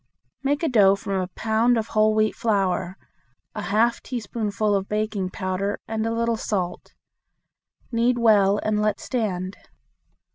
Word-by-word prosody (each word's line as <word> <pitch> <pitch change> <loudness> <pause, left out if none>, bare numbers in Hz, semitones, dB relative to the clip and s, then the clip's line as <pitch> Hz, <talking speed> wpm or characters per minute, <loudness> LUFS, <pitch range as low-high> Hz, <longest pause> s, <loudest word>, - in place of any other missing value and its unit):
Make 285 +4 0
a - - +3
dough 205 -7 +5
from 195 -1 -2
a 180 - -3
pound 225 +5 +1
of 220 0 -2
whole 215 0 +3
wheat 215 0 +2
flour, 190 -4 0 0.6
a - - -4
half 230 +3 +1
teaspoonful 215 -3 -2
of 195 -1 -1
baking 210 -3 -1
powder, 185 +1 -3
and 220 0 -2
a - - -1
little 230 0 0
salt. 185 -5 -3 1.0
Knead 240 +1 +2
well 205 -4 +4
and 210 -1 0
let 210 0 0
stand. 190 -6 -3
215 Hz, 145 wpm, -24 LUFS, 195-230 Hz, 1.0 s, dough